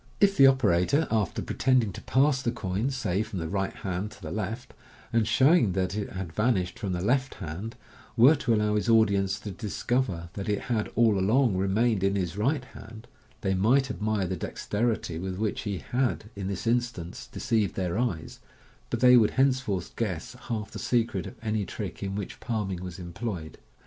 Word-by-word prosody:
If 200 Hz, -1 st, +4 dB
the 135 Hz, -, +8 dB
ok 130 Hz, -4 st, +4 dB
orator, 90 Hz, -, +2 dB
after 110 Hz, -5 st, 0 dB
pretending 125 Hz, -7 st, +1 dB
to -, -, -8 dB
pass 135 Hz, 0 st, +2 dB
the 120 Hz, -, 0 dB
coin, 105 Hz, +1 st, -2 dB
say, 120 Hz, -8 st, -1 dB
from 105 Hz, -, -5 dB
the 80 Hz, -2 st, -3 dB
right 95 Hz, +3 st, -1 dB
hand 95 Hz, +2 st, -4 dB
to -, -, -15 dB
the 75 Hz, -, -5 dB
Vft, 110 Hz, +5 st, -4 dB, 0.4 s
and 115 Hz, -2 st, +2 dB
showing 130 Hz, -, +4 dB
that 95 Hz, 0 st, -1 dB
it 105 Hz, -1 st, -3 dB
had 95 Hz, -4 st, -6 dB
vanished 95 Hz, -5 st, 0 dB
from 95 Hz, -3 st, -2 dB
the 90 Hz, 0 st, -2 dB
left 130 Hz, +3 st, +1 dB
hand, 95 Hz, +6 st, -6 dB, 0.4 s
were 125 Hz, +7 st, +8 dB
to 115 Hz, -3 st, +1 dB
allow 105 Hz, 0 st, +1 dB
his 105 Hz, +2 st, 0 dB
audience 100 Hz, -3 st, +3 dB
to 105 Hz, -, -5 dB
discover 100 Hz, -2 st, -2 dB
that 100 Hz, 0 st, -5 dB
it 105 Hz, -, 0 dB
had 110 Hz, -3 st, -1 dB
all 110 Hz, -3 st, +4 dB
along 110 Hz, +3 st, +3 dB
remained 100 Hz, +2 st, +1 dB
in 100 Hz, 0 st, +2 dB
his 90 Hz, -3 st, -2 dB
right 130 Hz, +6 st, 0 dB
hand, 110 Hz, -1 st, -12 dB, 0.3 s
they 95 Hz, -1 st, +1 dB
might 125 Hz, +8 st, +3 dB
admire 105 Hz, -2 st, -1 dB
the 95 Hz, +1 st, -2 dB
dexterity 105 Hz, -2 st, -2 dB
with 95 Hz, +1 st, -4 dB
which 105 Hz, 0 st, -1 dB
he 100 Hz, -3 st, -3 dB
had 120 Hz, -1 st, -2 dB
in 100 Hz, -1 st, -4 dB
this 100 Hz, +1 st, -4 dB
instance 115 Hz, -7 st, -2 dB
deceived 110 Hz, -4 st, -1 dB
theii 95 Hz, 0 st, -1 dB
eyes, -, -, -12 dB, 0.5 s
but 120 Hz, -, -2 dB
they 125 Hz, 0 st, +8 dB
would 110 Hz, -4 st, +6 dB
henceforth 130 Hz, -9 st, +1 dB
guess 105 Hz, 0 st, -3 dB, 0.2 s
half 110 Hz, -2 st, -3 dB
the -, -, -7 dB
secret 115 Hz, -7 st, 0 dB
of -, -, -9 dB
any 110 Hz, -1 st, 0 dB
trick -, -, -6 dB
in 100 Hz, 0 st, -3 dB
which 100 Hz, -2 st, -5 dB
palming 105 Hz, -6 st, -3 dB
was 90 Hz, -2 st, -7 dB
employed. 85 Hz, -2 st, -6 dB
105 Hz, 190 wpm, -27 LUFS, 95-120 Hz, 0.5 s, the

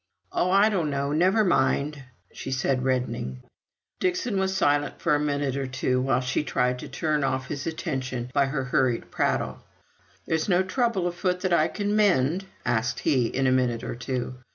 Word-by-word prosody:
"Oh, 180 Hz, -, +1 dB
I 200 Hz, +3 st, +5 dB
don't 180 Hz, -8 st, 0 dB
know! 140 Hz, 0 st, -1 dB
Never 185 Hz, +8 st, +3 dB
mind," 145 Hz, -3 st, +1 dB, 0.3 s
said -, -, -24 dB, 0.2 s
she, 135 Hz, +1 st, +2 dB
reddening. 125 Hz, -, -2 dB, 0.6 s
Dixon 190 Hz, +3 st, 0 dB
was 190 Hz, 0 st, 0 dB
silent 145 Hz, -5 st, +1 dB
for 170 Hz, -, +1 dB
a 145 Hz, -, +3 dB
minute 145 Hz, -2 st, -1 dB
or 135 Hz, -1 st, -2 dB
two, 130 Hz, 0 st, 0 dB
while 130 Hz, 0 st, +1 dB
she 130 Hz, +3 st, -1 dB
tried 125 Hz, -2 st, 0 dB
to -, -, -8 dB
turn 155 Hz, -3 st, 0 dB
off 130 Hz, -1 st, -1 dB
his 145 Hz, 0 st, -4 dB
attention 130 Hz, -6 st, -3 dB
by 140 Hz, -1 st, +3 dB
her 135 Hz, -1 st, -2 dB
hurried 125 Hz, -2 st, 0 dB
prattle. -, -, 0 dB, 0.7 s
"There's 160 Hz, +3 st, -1 dB
no 180 Hz, 0 st, +4 dB
trouble 220 Hz, -1 st, 0 dB
afoot 180 Hz, +1 st, -1 dB
that 185 Hz, -2 st, 0 dB
I 160 Hz, -2 st, +4 dB
can 205 Hz, 0 st, -2 dB
mend?" 185 Hz, -4 st, +2 dB, 0.2 s
asked 120 Hz, +1 st, 0 dB
he, 130 Hz, -5 st, +2 dB
in 135 Hz, +3 st, -1 dB
a 130 Hz, -, +4 dB
minute 125 Hz, -3 st, +1 dB
or -, -, -4 dB
two. 125 Hz, 0 st, -4 dB
145 Hz, 180 wpm, -26 LUFS, 130-180 Hz, 0.7 s, I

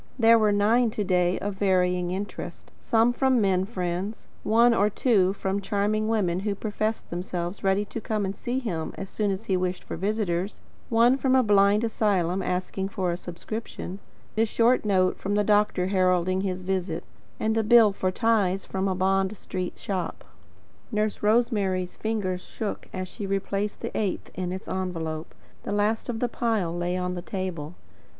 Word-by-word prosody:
There 230 Hz, -1 st, +6 dB
were 215 Hz, -1 st, +3 dB
nine 220 Hz, +4 st, +3 dB
to 210 Hz, -, +1 dB
day, 180 Hz, -1 st, +2 dB
of 205 Hz, +1 st, -3 dB
varying 180 Hz, -2 st, +2 dB
interest, 195 Hz, +3 st, -6 dB
some 230 Hz, 0 st, +3 dB
from 260 Hz, 0 st, +3 dB
men 190 Hz, -3 st, +2 dB
friends, 185 Hz, 0 st, -4 dB
one 230 Hz, +2 st, +4 dB
or 210 Hz, -2 st, +3 dB
two 200 Hz, -4 st, +3 dB
from 195 Hz, 0 st, -2 dB
charming 210 Hz, +2 st, 0 dB
women 190 Hz, -6 st, +1 dB
who 200 Hz, +1 st, -1 dB
professed 215 Hz, +2 st, -3 dB
themselves 175 Hz, +1 st, -4 dB
ready 195 Hz, +1 st, +2 dB
to 225 Hz, -, -6 dB
come 215 Hz, -2 st, -1 dB
and 195 Hz, +1 st, -3 dB
see 245 Hz, +5 st, -3 dB
him 180 Hz, -11 st, -3 dB
as 195 Hz, -, -6 dB
soon 210 Hz, -2 st, 0 dB
as 195 Hz, +3 st, -3 dB
he 195 Hz, -, +1 dB
wished 180 Hz, 0 st, -1 dB
for -, -, -6 dB
visitors, 195 Hz, -1 st, -1 dB, 0.3 s
one 235 Hz, +3 st, +5 dB
from 265 Hz, -1 st, +2 dB
a 260 Hz, -, +5 dB
blind 205 Hz, 0 st, +4 dB
asylum 195 Hz, -5 st, +1 dB
asking 185 Hz, +1 st, -2 dB
for 190 Hz, -4 st, -1 dB
a -, -, -1 dB
subscription, 185 Hz, +2 st, -6 dB, 0.4 s
a 220 Hz, -, +3 dB
short 230 Hz, +2 st, +2 dB
note 185 Hz, -3 st, +2 dB
from 200 Hz, +1 st, -1 dB
the 210 Hz, -, +3 dB
doctor 205 Hz, -3 st, +2 dB
heralding 185 Hz, -1 st, +2 dB
his 185 Hz, -2 st, -3 dB
visit, 180 Hz, -3 st, -2 dB, 0.4 s
and 220 Hz, 0 st, +1 dB
a 225 Hz, -, +3 dB
bill 220 Hz, -1 st, +7 dB
for 185 Hz, -1 st, 0 dB
ties 195 Hz, -2 st, +1 dB
from 190 Hz, 0 st, -2 dB
a 190 Hz, -, 0 dB
Bond 190 Hz, +2 st, +1 dB
Street 185 Hz, -1 st, -5 dB
shop. 190 Hz, -3 st, -4 dB, 0.7 s
Nurse 215 Hz, -1 st, -1 dB
Rosemary's 210 Hz, -5 st, +1 dB
fingers 200 Hz, -5 st, -2 dB
shook 210 Hz, +2 st, -5 dB
as 185 Hz, 0 st, -4 dB
she 200 Hz, +2 st, -6 dB
replaced 195 Hz, +1 st, -2 dB
the -, -, -5 dB
eighth 205 Hz, -4 st, -2 dB
in 180 Hz, 0 st, -3 dB
its 190 Hz, +1 st, -6 dB
envelope. 165 Hz, -4 st, -4 dB, 0.3 s
The -, -, -5 dB
last 210 Hz, +3 st, 0 dB
of 225 Hz, -2 st, -3 dB
the 245 Hz, -, +2 dB
pile 220 Hz, -8 st, -1 dB
lay 175 Hz, +1 st, -1 dB
on 180 Hz, 0 st, -2 dB
the 175 Hz, -, -4 dB
table. 180 Hz, -4 st, -5 dB
195 Hz, 175 wpm, -26 LUFS, 185-215 Hz, 0.7 s, bill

